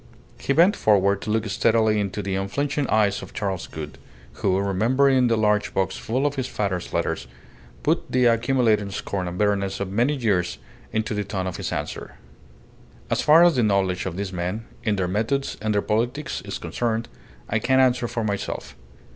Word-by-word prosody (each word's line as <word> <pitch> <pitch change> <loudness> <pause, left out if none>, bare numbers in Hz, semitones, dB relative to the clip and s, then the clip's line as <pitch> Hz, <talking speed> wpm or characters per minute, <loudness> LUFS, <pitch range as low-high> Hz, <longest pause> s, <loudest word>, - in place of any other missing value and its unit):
He - - -2
bent 170 +8 +5
forward 100 -1 +3
to - - -5
look 110 0 +1
steadily 110 +1 +2
into 100 0 -2
the 95 0 -2
unflinching 140 +9 -1
eyes 105 -2 +2
of 95 - -10
Charles 95 -4 -3
Gould, 75 -1 -8 0.4
who, 95 -1 +2
remembering 125 +7 +3
the 115 -1 +2
large 105 -1 +1
box 95 - 0
full 130 +5 -1
of 145 -1 -1
his 130 -1 -1
father's 100 -7 -3
letters, - - -2 0.6
put - - 0
the 125 -1 +3
accumulated 115 -3 +2
scorn 95 -2 -3
and 90 0 -5
bitterness 100 -1 0
of 100 -1 -3
many 120 +8 +2
years 100 -9 0 0.3
into 110 0 -1
the 105 0 -1
tone 100 -2 -3
of 95 - -4
his - - -4
answer - - -5 1.0
"As - - +2
far 160 +3 +7
as 175 -5 +4
the - - +4
knowledge 95 -4 +1
of 90 -1 -5
these 100 -1 -4
men 90 +6 -3 0.2
and 110 -4 +1
their 95 -2 0
methods 115 +9 -1
and 110 0 0
their 105 - +1
politics 120 +7 -1
is - - -4
concerned, 115 -1 -2 0.4
I 110 - 0
can 130 +4 +2
answer 125 -2 +3
for 115 0 -3
myself. 100 -9 -4
105 Hz, 185 wpm, -24 LUFS, 100-120 Hz, 1.0 s, far